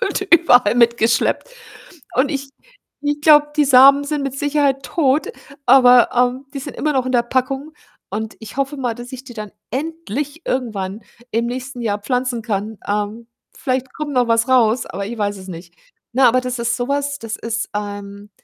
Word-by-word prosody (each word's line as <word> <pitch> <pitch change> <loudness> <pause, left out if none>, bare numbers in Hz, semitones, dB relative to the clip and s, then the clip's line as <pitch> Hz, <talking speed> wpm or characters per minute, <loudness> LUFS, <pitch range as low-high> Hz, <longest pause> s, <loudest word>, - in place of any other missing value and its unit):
und - - 0
überall 250 -10 +4
mitgeschleppt 235 - +2 0.7
und 265 +3 +2
ich 275 -2 -4 0.5
ich 290 0 -1
glaube, 295 -1 +6
die 300 - +4
Samen 275 +1 +7
sind 290 0 -2
mit 275 -1 -4
Sicherheit 285 -1 +1
tot, 285 +3 +1 0.4
aber, 250 -1 +7
ähm, 250 +2 +1
die - - -3
sind 285 +1 -8
immer 305 - 0
noch 260 -2 0
in 255 - -2
der 240 -2 +3
Packung. 265 +4 -2 0.4
Und 215 +2 -4
ich 220 +1 -10
hoffe 275 +1 -1
mal, 250 -4 -2
dass 240 +3 -10
ich 260 0 -7
die 250 -3 -11
dann 215 -3 -7 0.2
endlich 300 0 -4
irgendwann 215 -5 -3 0.3
im 230 +1 0
nächsten 250 +1 -5
Jahr 210 -2 -1
pflanzen 250 +1 -2
kann. 215 -1 -3
Ähm, 210 +3 -3 0.3
vielleicht 260 0 -2
kommt 305 -1 -5
noch 250 -1 +3
was 230 +2 +2
raus, 245 -2 +3
aber 200 0 -5
ich 235 +3 -6
weiß 205 -1 -1
es 185 - -11
nicht. 170 -1 -10 0.4
Ne, 260 +2 +3
aber 255 +2 +4
das 255 0 -4
ist 235 +1 0
so 245 0 -3
was, 285 0 -1
das 225 -1 -5
ist, 230 0 -3
ähm, 205 0 -7
250 Hz, 185 wpm, -19 LUFS, 225-275 Hz, 0.7 s, Samen